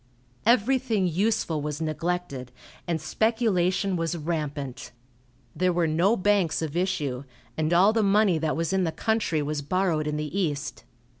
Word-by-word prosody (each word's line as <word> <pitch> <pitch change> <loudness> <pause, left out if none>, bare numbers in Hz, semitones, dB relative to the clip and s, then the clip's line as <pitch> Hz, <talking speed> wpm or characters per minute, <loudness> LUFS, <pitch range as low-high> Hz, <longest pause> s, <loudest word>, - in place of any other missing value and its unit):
Everything 235 -3 +3
useful 175 -3 0
was 150 0 -4
neglected, 160 -4 -3 0.4
and 170 -2 0
speculation 195 0 +1
was 165 0 -1
rampant. 150 -6 -4 0.6
There 185 0 +2
were 175 -1 +1
no 170 +8 +2
banks 190 -5 +1
of 155 -1 -4
issue, 150 -8 -1 0.3
and 155 +2 -1
all 185 +5 +5
the 225 - +2
money 200 -4 +3
that 155 -1 -1
was 165 +1 -1
in 190 -1 +2
the 165 - 0
country 210 -7 0
was 150 0 -2
borrowed 160 0 0
in 150 0 -1
the 150 +3 -4
East. 150 -7 -2
170 Hz, 150 wpm, -26 LUFS, 155-195 Hz, 0.6 s, all